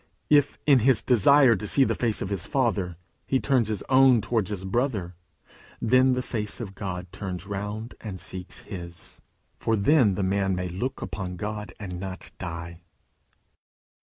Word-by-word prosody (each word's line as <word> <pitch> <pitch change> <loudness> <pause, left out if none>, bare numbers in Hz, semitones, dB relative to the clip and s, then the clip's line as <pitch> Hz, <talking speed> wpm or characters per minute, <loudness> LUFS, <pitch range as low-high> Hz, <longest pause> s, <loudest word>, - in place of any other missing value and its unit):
If, 145 -1 +4
in 140 -3 +6
his 120 -1 +3
desire 130 +2 +6
to 105 +2 -4
see 135 - +4
the - - +1
face 115 -3 -1
of 100 - -5
his 95 -4 -3
Father, 105 - 0 0.3
he 135 - +2
turns 130 -6 +2
his 110 -3 -3
own 130 -2 +6
towards 110 -2 -1
his 95 -3 -4
brother, 105 -4 -1 0.7
then 130 +3 +4
the 125 0 -1
face 105 -3 -4
of 105 -5 -6
God 90 -2 -5
turns 90 -3 -5
round 105 +3 -5
and 100 -4 -6
seeks 90 +2 -8
his, 85 -4 -9 0.4
for 115 - +1
then 110 -1 +4
the 95 - -1
man 95 0 +1
may 90 0 -3
look 110 +10 -4
upon 90 -2 -5
God 105 +3 -5
and 90 -4 -6
not 95 -1 -7
die. 85 0 -6
105 Hz, 165 wpm, -26 LUFS, 95-125 Hz, 0.7 s, in